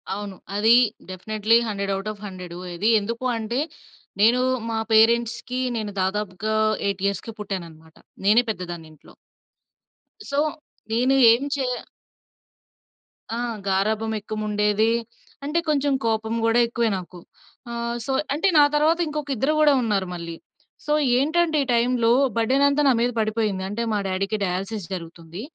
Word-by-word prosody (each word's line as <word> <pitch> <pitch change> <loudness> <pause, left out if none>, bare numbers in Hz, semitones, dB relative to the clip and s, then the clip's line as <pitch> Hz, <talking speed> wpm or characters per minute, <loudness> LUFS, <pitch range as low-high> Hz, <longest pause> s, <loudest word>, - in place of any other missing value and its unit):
అవును. 205 -1 -6 0.2
అది 220 +3 +5 0.4
definitely 215 +4 +1
100 200 -2 -2
out 195 +2 -4
of 205 - -17
100. 180 -2 -8 0.2
ఇది 205 +6 +1
ఎందుకూ 230 +5 -5
అంటే? 225 +3 -2 0.6
నేను 235 +4 +5 0.3
మా 225 -1 -1
పేరెంట్స్‌కి 235 +2 +3 0.2
నేను 215 -2 -3
దాదాపుగా 205 +2 -2 0.3
8 195 -1 -2
ఇయర్స్‌కి 200 +3 -4
పుట్టాననమాట. 165 -6 -7 0.3
నేనే 215 +4 +5
పెద్దదాన్ని 175 -5 -5
ఇంట్లో. 155 - -19 1.2
సో 280 - -2 0.5
నేను 250 +4 +2 0.2
ఎం 240 +4 -1
చేయ 260 -3 -1 1.6
ఆ! - - -3 0.3
గారాబం 215 +3 0
ఎక్కువుండేది. 210 0 0 0.5
అంటే 300 +4 0
కొంచెం 285 -1 +2
కోపం 220 0 0
గూడా 230 +1 +3
ఎక్కువే 235 -1 0
నాకు. 180 -1 -9 0.5
ఆహ్, 235 0 -3
సో 275 - -2 0.2
అంటే 320 +7 +1
నా - - +8
తర్వాత 315 +3 +3
ఇంకొకిద్దరు 295 -2 -1
గూడా 300 -1 +5
ఉన్నారు 200 -4 0
మళ్ళీ. 170 -1 -6 0.5
సో 300 - +1 0.2
ఏంటంటే 315 +4 +2
ఈ - - -6
టైంలో 235 -1 +2 0.3
బర్డెనంతా 275 +5 +3
నా 270 - +5
మీద 245 +1 +1
పడిపోయింది. 215 -3 -1
అంటే 210 +4 -3
మా - - +1
డ్యాడీకి 195 +3 -1
డయాలిసిస్ 195 +2 -3
జరుగుతుంది. 170 0 -8
220 Hz, 130 wpm, -23 LUFS, 195-240 Hz, 1.6 s, నా